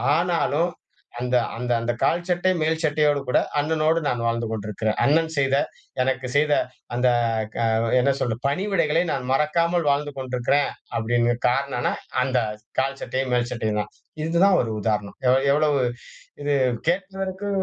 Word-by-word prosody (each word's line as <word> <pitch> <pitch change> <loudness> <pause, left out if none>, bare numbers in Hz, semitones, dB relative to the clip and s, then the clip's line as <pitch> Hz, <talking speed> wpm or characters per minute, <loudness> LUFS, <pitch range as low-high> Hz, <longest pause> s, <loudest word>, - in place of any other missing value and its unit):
ஆனாலும் 170 -1 +1 0.5
அந்த, 125 +1 -1 0.2
அந்த, 125 +1 -3
அந்த 120 +1 -1
கால் 170 +2 +2
சட்டை, 180 +1 +2
மேல் 160 +1 +1
சட்டையோடு 150 -2 +2
கூட, 125 - +3 0.2
அண்ணனோடு 155 +2 +2
நான் 125 -4 0
வாழ்ந்து 115 0 0
கொண்டிருக்கிறேன். 110 0 -2
அண்ணன் 160 +3 +3
செய்த 135 -1 +2 0.5
எனக்கு 130 0 0
செய்த 150 +1 +3 0.4
அந்த 125 +1 +2 0.5
க 115 - 0 0.3
என்ன 135 +3 +3
சொல்றது, 120 0 -2
பணிவிடைகளை 170 0 +1
நான் 125 - -3
மறக்காமல் 170 +4 +1
வாழ்ந்து 145 +1 0
கொண்டிருக்கிறேன். 130 +2 0 0.3
அப்படிங்க 120 +1 +1
காரணம்ன்னா, 125 0 0 0.3
அந்த 130 -1 +1 0.4
கால் 135 +1 -1
சட்டையும் 130 -1 -2
மேல் 120 0 +1
சட்டையும் 110 -3 -1
தான். - - -8 0.3
இதுதான் 175 +4 +4
ஒரு 115 -2 -3
உதாரணம். 105 -1 -2
எவ் 130 +2 +4
எவ்வளவு 145 -1 +2 0.6
இது 145 0 +1 0.3
கேக்குறதுக்கு 190 +2 -2
140 Hz, 140 wpm, -23 LUFS, 125-160 Hz, 0.6 s, இதுதான்